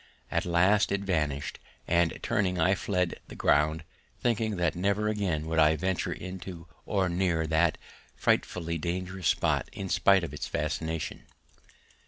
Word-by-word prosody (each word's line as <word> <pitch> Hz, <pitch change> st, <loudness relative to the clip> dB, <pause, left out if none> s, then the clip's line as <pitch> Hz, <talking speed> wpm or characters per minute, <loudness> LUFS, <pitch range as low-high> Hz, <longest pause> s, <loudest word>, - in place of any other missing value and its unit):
At 85 Hz, +3 st, 0 dB
last 95 Hz, +4 st, +3 dB
it 100 Hz, 0 st, 0 dB
vanished, 75 Hz, -7 st, -1 dB, 0.3 s
and 85 Hz, -1 st, +2 dB
turning 90 Hz, -3 st, 0 dB
I 90 Hz, +4 st, +4 dB
fled 90 Hz, -3 st, 0 dB
from -, -, -10 dB
the -, -, -10 dB
ground, 75 Hz, +2 st, +2 dB, 0.4 s
thinking 110 Hz, -3 st, 0 dB
that 85 Hz, -3 st, 0 dB
never 100 Hz, +4 st, +1 dB
again 95 Hz, -8 st, -1 dB
would 80 Hz, 0 st, 0 dB
I 80 Hz, 0 st, +5 dB
venture 95 Hz, +3 st, -1 dB
into 90 Hz, -2 st, -7 dB, 0.2 s
or 95 Hz, -2 st, +1 dB
near 85 Hz, -2 st, +1 dB
that 80 Hz, +1 st, +2 dB, 0.4 s
frightfully 85 Hz, -2 st, 0 dB
dangerous 90 Hz, +1 st, -3 dB
spot -, -, +1 dB
in 95 Hz, -1 st, -6 dB
spite 95 Hz, 0 st, +4 dB
of 85 Hz, -, -5 dB
its -, -, -4 dB
fascination. 80 Hz, +2 st, -3 dB
90 Hz, 150 wpm, -29 LUFS, 80-95 Hz, 0.4 s, I